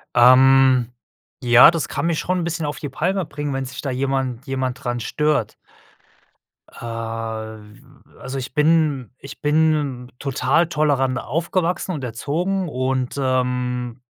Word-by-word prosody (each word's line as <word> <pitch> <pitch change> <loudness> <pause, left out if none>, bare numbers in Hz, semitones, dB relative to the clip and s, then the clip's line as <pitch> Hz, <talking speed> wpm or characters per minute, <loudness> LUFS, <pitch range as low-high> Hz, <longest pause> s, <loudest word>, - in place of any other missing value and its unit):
Ähm, 130 0 +6 0.5
ja, 125 +5 +7
das 165 -3 -2
kann 145 +3 -3
mich 165 -2 0
schon 185 0 -1
'n - - -2
bisschen 165 -2 -3
auf 145 -2 -4
die 145 - -5
Palme 185 +6 -1
bringen, 145 -1 -5
wenn 135 0 -2
sich 125 +1 -7
da 140 - -3
jemand 135 -1 -2
jemand 130 0 -3
dran 120 -1 -2
stört. 150 -1 -1 1.1
Äh, - - -26
w 115 -2 -6 0.4
also, 135 - -6
ich 130 -1 -6
bin 150 -5 +2
ich 140 - -11
bin 145 -5 +1
total 150 +4 +1
tolerant 145 -5 +1
aufgewachsen 170 +5 -2
und 145 -5 -5
erzogen 165 - -2
und, 130 -1 -2
ähm, 125 -1 -1
135 Hz, 140 wpm, -21 LUFS, 125-150 Hz, 1.1 s, ja